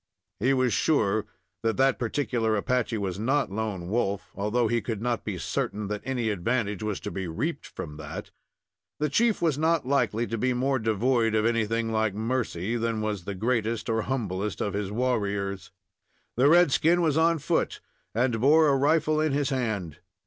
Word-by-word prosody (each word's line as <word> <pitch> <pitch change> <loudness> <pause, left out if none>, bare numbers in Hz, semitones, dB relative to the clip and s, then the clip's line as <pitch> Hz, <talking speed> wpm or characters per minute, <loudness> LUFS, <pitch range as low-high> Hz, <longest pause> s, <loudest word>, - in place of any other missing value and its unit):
He 125 +6 +2
was 130 -3 +2
sure 110 -9 +1 0.3
that 115 -1 0
that 135 0 +3
particular 120 -3 0
Apache 120 +1 0
was 95 -2 -3
not 135 +1 +1
Lone 100 -4 -3
Wolf, 100 -1 -1
although 105 +4 0
he 120 +1 +1
could 110 -1 -4
not 120 +1 -1
be 105 -4 -4
certain 105 +3 -3
that 105 0 -3
any 125 -3 -1
advantage 105 +1 -1
was 105 -2 -2
to - - -5
be 95 -2 -4
reaped 140 - -3
from 75 -3 -8
that. 75 -1 -7 0.7
The 150 0 +1
chief 220 +7 +2
was 155 -4 +1
not 160 -2 +2
likely 125 -4 +1
to 115 -1 -4
be 130 +3 +1
more 130 +2 +1
devoid 115 +1 +1
of 110 0 +2
anything 115 0 0
like 110 -2 0
mercy 115 -3 -2
than 115 -1 -1
was 105 -4 -3
the 100 - -4
greatest 115 +1 -1
or 110 0 +1
humblest 105 -5 -2
of 100 - -1
his 100 -1 -2
warriors. 100 -5 -1 0.6
The 130 +4 +4
red 175 -2 +6
skin 170 +5 +3
was 155 -3 +2
on 165 +1 +3
foot, 145 - -1 0.4
and 120 -1 +1
bore 155 +3 +5
a 140 - +4
rifle 155 +2 +2
in 155 -2 +1
his 145 0 0
hand. 110 - -2
115 Hz, 180 wpm, -27 LUFS, 105-135 Hz, 0.7 s, red